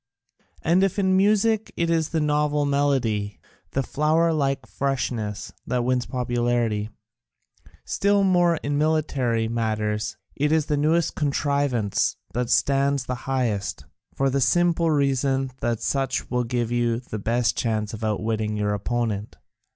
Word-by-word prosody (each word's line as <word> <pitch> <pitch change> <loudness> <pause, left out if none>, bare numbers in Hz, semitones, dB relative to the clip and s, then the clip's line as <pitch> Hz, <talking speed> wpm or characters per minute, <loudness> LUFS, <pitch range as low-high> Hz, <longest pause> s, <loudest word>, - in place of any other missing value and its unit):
And 175 +4 +3
if 195 0 0
in 190 -2 +2
music 210 +2 +2
it 170 0 +1
is 160 -2 +1
the 165 - 0
novel 150 -1 +1
melody, 130 -8 0 0.3
the 135 - +1
flower 160 +4 +2
like 135 -3 0
freshness, 120 -6 -3
that 125 -1 0
wins 125 0 0
popularity, 120 -4 0 1.0
still 200 0 +2
more 175 -3 +4
in 145 0 0
military 140 -7 +1
matters 110 -3 -2 0.2
it 150 +2 +1
is 160 -2 +2
the 150 - 0
newest 155 +3 +2
contrivance 140 -7 0 0.2
that 125 0 -1
stands 140 0 +2
the 125 - -2 0.2
highest, 115 -7 -1 0.3
for 135 0 +1
the 140 +1 0
simple 170 +2 +3
reason 135 -2 +1
that 120 -2 -1
such 135 -1 -1
will 125 -1 +1
give 120 -1 -1
you 120 -1 +1
the 115 -4 -7
best 115 +2 +1
chance 110 -2 -1
of 110 0 -7
outwitting 110 0 -1
your 105 0 0
opponent. 105 0 -2
135 Hz, 140 wpm, -24 LUFS, 115-150 Hz, 1.0 s, more